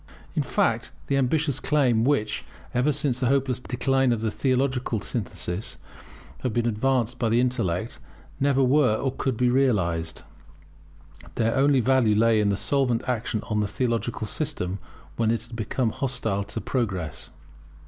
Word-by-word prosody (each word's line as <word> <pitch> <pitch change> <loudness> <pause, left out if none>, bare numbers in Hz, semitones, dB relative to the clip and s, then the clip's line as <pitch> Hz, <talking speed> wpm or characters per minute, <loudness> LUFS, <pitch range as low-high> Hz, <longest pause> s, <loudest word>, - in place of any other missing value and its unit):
In - - +2
fact, - - 0
the 140 - 0
ambitious 140 +1 +1
claims 125 -6 +2
which, 120 -8 0 0.3
ever 125 +5 +2
since 130 -3 -1
the 130 - +1
hopeless 135 -1 +1
decline 130 +1 +1
of 115 -2 0
the 110 -1 0
theological 130 -2 0
synthesis, 100 -3 -4 0.6
have 125 - -1
been 120 +1 +1
advanced 125 +1 0
by 115 - +1
the 115 +2 +3
intellect, 115 -6 -1 0.4
never 135 -1 +3
were 130 -3 +4
or 135 +4 -1
could 130 -2 -2
be 125 0 +3
realized. 85 - +1 1.1
Their 115 -1 +1
only 135 -1 +4
value 125 -4 +3
lay 115 0 +4
in 105 -1 +2
their 100 - +1
solvent 125 -1 +1
action 115 -3 -1
on 105 -1 -1
the 105 - +1
theological 115 0 -1
system 105 - -3 0.4
when 115 -1 +2
it 115 0 0
had 115 0 -10
become 115 +1 -1
hostile 115 -7 -2
to 105 - -5
progress. 100 - -3
120 Hz, 155 wpm, -25 LUFS, 110-135 Hz, 1.1 s, were